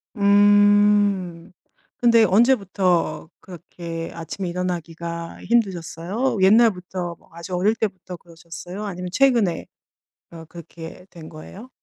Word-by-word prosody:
음. 205 -3 +3 0.5
근데 235 -2 +4
언제부터 195 -6 +1
그렇게 170 -2 -8
아침에 170 +3 -6
일어나기가 170 -1 -5
힘드셨어요? 200 +1 -1
옛날부터 190 -4 +2
뭐 - - -27
아주 170 +2 -7
어릴 200 +5 +1
때부터 185 -5 -5
그러셨어요? 170 +3 -10
아니면 180 -2 -6
최근에 230 -8 +1 0.7
어 165 -1 -11
그렇게 170 +1 -11
된 160 -3 -12
거예요? 190 +9 -12
180 Hz, 275 characters per minute, -22 LUFS, 170-205 Hz, 0.7 s, 근데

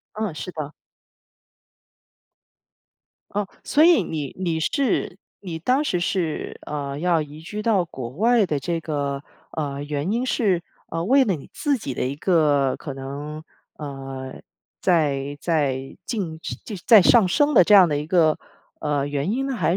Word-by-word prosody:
嗯， 215 -6 -2
是 180 - -6
的。 155 -2 -5 2.6
哦， 205 -1 -1 0.2
所 300 - +3
以 340 -1 +6
你 150 -3 -5
你 170 -4 -1
是 220 - 0 0.2
你 175 -4 -6
当 255 - +1
时 180 -11 0
是， 175 -4 -2
呃， 140 -1 -4
要 170 -2 +2
移 150 +1 -8
居 210 +6 -6
到 205 -6 +2
国 130 -7 -7
外 220 - +3
的 150 -4 -1
这 165 +5 -2
个， 140 -2 -3 0.3
呃， 145 -3 -3
原 145 +5 -2
因 240 +3 0
是， 195 -9 +1 0.3
呃， 165 0 -2
为 270 +4 +5
了 195 -7 +1
你 140 - -11
自 285 -3 0
己 135 - -5
的 - - -2
一 135 - -2
个 150 -6 +2
可 140 - -7
能， 145 +3 -6 0.4
呃， 135 -2 -7 0.4
在 145 -5 +1
在 135 -5 -1
进 175 -9 -3
升 - - -5 0.3
在 220 -5 +9
上 225 +1 +6
升 290 +8 +3
的 - - +8
这 210 - +3
样 190 -3 +9
的 145 -2 0
一 150 - -3
个， 160 -2 +3 0.4
呃， 145 -1 0
原 145 +6 -1
因 270 +3 -1
呢， 265 - -2
还 175 -4 +1
160 Hz, 175 characters per minute, -23 LUFS, 145-200 Hz, 2.6 s, 在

